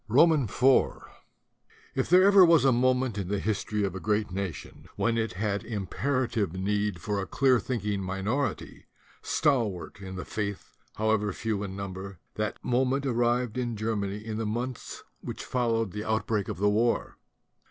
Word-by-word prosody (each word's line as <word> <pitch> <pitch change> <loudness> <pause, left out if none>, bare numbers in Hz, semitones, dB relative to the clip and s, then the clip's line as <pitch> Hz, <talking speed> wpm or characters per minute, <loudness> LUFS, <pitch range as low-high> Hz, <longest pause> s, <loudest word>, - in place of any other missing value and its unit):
33 - - -30
THE 115 - +1
DUTY 165 +2 +7
OF 155 - +2
THE 120 -1 -4
INTELLECTUALS 135 0 +3
IV - - -26
Ir - - +3 0.2
there 190 - +6
ever 200 -2 +8
was 165 -4 +5
a 135 - +6
moment 125 -2 +2
in 95 - -3
the 100 +2 -1
history 105 0 -1
of 95 -3 -1
a 95 - -5
great 105 0 0
nation 95 -4 -6
when 115 -1 +1
it 115 -3 -1
had 100 +2 -2
imperative 115 - -1
need 100 0 -1
for 100 +3 -2
a 95 - -5
clear 130 -3 +3
thinking 105 -6 -2
minority, 95 +9 -3 0.3
stalwart 110 - 0
in 95 -1 -7
the 90 - -5
faith 100 -2 -4 0.2
however 110 -1 +1
few 105 +1 -2
in 95 -2 -5
number, 95 -1 -6 0.2
that 105 0 -2
moment 130 +3 +1
arrived 120 -1 +1
in 120 -2 -2
Germany 105 -2 -2
in 110 +1 -5
the 110 - -1
months 120 +3 -4 0.2
which - - -7
followed 115 -4 0
the 105 +2 -5
outbreak 110 -2 0
of - - -4
the 100 +2 +2
war. 110 +3 +1
110 Hz, 180 wpm, -28 LUFS, 100-125 Hz, 0.3 s, ever